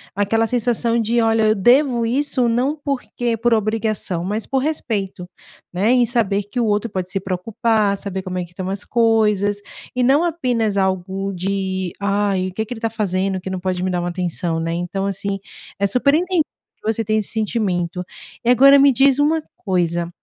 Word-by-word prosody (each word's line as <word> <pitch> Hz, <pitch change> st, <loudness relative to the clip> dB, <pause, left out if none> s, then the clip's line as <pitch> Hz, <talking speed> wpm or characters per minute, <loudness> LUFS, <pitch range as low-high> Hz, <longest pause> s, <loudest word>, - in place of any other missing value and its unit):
aquela 215 Hz, +3 st, +1 dB
sensação 235 Hz, 0 st, 0 dB
de: 230 Hz, +2 st, +1 dB
"Olha, 225 Hz, -1 st, +3 dB
eu 215 Hz, -, +3 dB
devo 240 Hz, +3 st, +3 dB
isso 255 Hz, 0 st, +1 dB
não 255 Hz, +6 st, 0 dB
porque 250 Hz, -4 st, -2 dB
por 235 Hz, +1 st, +2 dB
obrigação, 215 Hz, -5 st, -1 dB
mas 210 Hz, +4 st, -2 dB
por 270 Hz, -, 0 dB
respeito.", 205 Hz, -, -3 dB, 0.5 s
né, 195 Hz, +6 st, +1 dB
em 250 Hz, -1 st, +4 dB
saber 215 Hz, -4 st, 0 dB
que 205 Hz, +5 st, -5 dB
o 235 Hz, -, +2 dB
outro 210 Hz, +2 st, 0 dB
pode 185 Hz, -1 st, -3 dB
se 195 Hz, -, -1 dB
preocupar, 200 Hz, +3 st, 0 dB
saber 190 Hz, -1 st, -5 dB
como 185 Hz, -1 st, -5 dB
é 180 Hz, -, -1 dB
que 175 Hz, -, -13 dB
estão 185 Hz, +1 st, -5 dB
as 195 Hz, +1 st, -4 dB
coisas 215 Hz, -3 st, +2 dB, 0.4 s
e 250 Hz, -, +1 dB
não 275 Hz, +6 st, +4 dB
apenas 245 Hz, -, 0 dB
algo 190 Hz, +1 st, -1 dB
de: 190 Hz, 0 st, -2 dB
"Ai, 200 Hz, -2 st, 0 dB
o -, -, -12 dB
que 220 Hz, -, -2 dB
que 220 Hz, -, -14 dB
ele -, -, -9 dB
tá 225 Hz, -, -1 dB
fazendo, 195 Hz, -3 st, -1 dB
que 190 Hz, -, -6 dB
não 185 Hz, -1 st, -3 dB
pode 180 Hz, -1 st, -2 dB
me 185 Hz, -, 0 dB
dar 180 Hz, -1 st, -1 dB
uma 175 Hz, 0 st, -2 dB
atenção?", 175 Hz, -2 st, -2 dB
né. 165 Hz, 0 st, -2 dB
Então 175 Hz, +3 st, -2 dB
assim, 195 Hz, 0 st, -3 dB, 0.4 s
é 200 Hz, -, +2 dB
super 250 Hz, +7 st, +2 dB
entendível 350 Hz, 0 st, +2 dB, 0.4 s
que 220 Hz, +1 st, -1 dB
você 225 Hz, -, -2 dB
tenha 215 Hz, 0 st, +1 dB
esse 210 Hz, -, -2 dB
sentimento 185 Hz, -6 st, -1 dB, 0.4 s
e 240 Hz, -, +3 dB
agora 275 Hz, +3 st, +7 dB
me 275 Hz, -1 st, +6 dB
diz 270 Hz, +2 st, +4 dB
uma 310 Hz, +2 st, +2 dB, 0.2 s
coisa, 175 Hz, -4 st, -1 dB
210 Hz, 195 wpm, -20 LUFS, 190-240 Hz, 0.5 s, agora